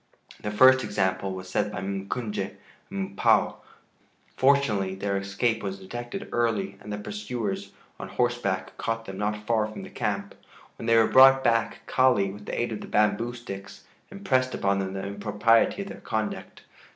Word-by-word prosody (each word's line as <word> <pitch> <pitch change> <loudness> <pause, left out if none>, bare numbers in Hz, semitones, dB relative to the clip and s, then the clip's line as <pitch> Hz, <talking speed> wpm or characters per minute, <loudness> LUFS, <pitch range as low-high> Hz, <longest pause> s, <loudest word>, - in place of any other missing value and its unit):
The 105 - -3
first 130 +5 +6
example 100 -2 -1
was 95 0 -7
set 100 +3 -1
by - - -4
M'Kunje 100 +3 -3 0.3
and 100 0 -4
M'Pua. - - +3 0.8
Fortunately 120 -9 +2
their 100 +1 -2
escape 100 +4 0
was 100 -1 -4
detected 120 - -6
early, 100 -5 0
and 105 0 -6
pursuers 105 0 -4 0.3
on - - -6
horseback 100 -6 -1
caught 115 0 -2
them 95 -1 -7
not 105 0 -2
far 110 -2 +2
from 110 - -8
the - - -10
camp; - - -2 0.5
when 115 - -5
they 115 0 +5
were 115 - +6
brought 135 +2 +7
back 115 -1 +1
Kali, 125 -7 +3
with 105 +1 -11
the - - -3
aid 120 0 -1
of 110 - -4
the - - -8
bamboo 115 +3 +1
sticks, 100 -5 -9 0.3
impressed 130 -11 0
upon 100 0 +1
them 95 0 -3
the 95 0 -4
impropriety 105 - +2
of 200 - -9
their - - -9
conduct. 110 -1 -4
105 Hz, 165 wpm, -26 LUFS, 100-120 Hz, 0.8 s, brought